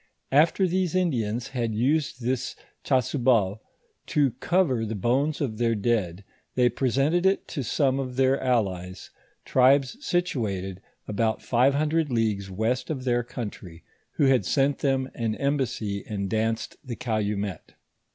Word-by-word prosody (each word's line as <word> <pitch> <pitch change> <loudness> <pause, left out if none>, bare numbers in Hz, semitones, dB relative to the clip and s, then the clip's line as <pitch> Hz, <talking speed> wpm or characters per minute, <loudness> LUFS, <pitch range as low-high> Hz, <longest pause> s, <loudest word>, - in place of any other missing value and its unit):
After 165 +7 +4
these 185 0 0
Indians 120 - 0
had 115 -4 -2
used 130 +2 0
this 125 +1 -1 0.3
chasuble 120 -6 +2 0.5
to 145 -4 +2
cover 170 -11 +2
the 110 0 -3
bones 130 +9 +1
of 120 -7 -3
their 115 -1 +2
dead, 100 -4 -1 0.3
they 125 -1 +4
presented 135 +8 +1
it 190 +1 +2
to 145 - -3
some 135 +2 +1
of 130 -2 -4
their 135 +1 +2
allies, 95 -8 -1 0.3
tribes 135 - +3
situated 100 - -2 0.3
about 110 +1 -1
five 130 +3 +3
hundred 155 0 +1
leagues 105 -4 0
west 110 +6 -1
of 140 -5 -3
their 120 -1 +1
country, 105 -8 -8 0.3
who 145 - +2
had 130 -5 +4
sent 135 +7 +1
them 135 -2 +1
an 115 -2 -2
embassy 125 -8 -1
and 100 -2 -3
danced 110 0 -1
the 125 -4 -5
calumet. 105 -5 -3
125 Hz, 140 wpm, -26 LUFS, 110-140 Hz, 0.5 s, After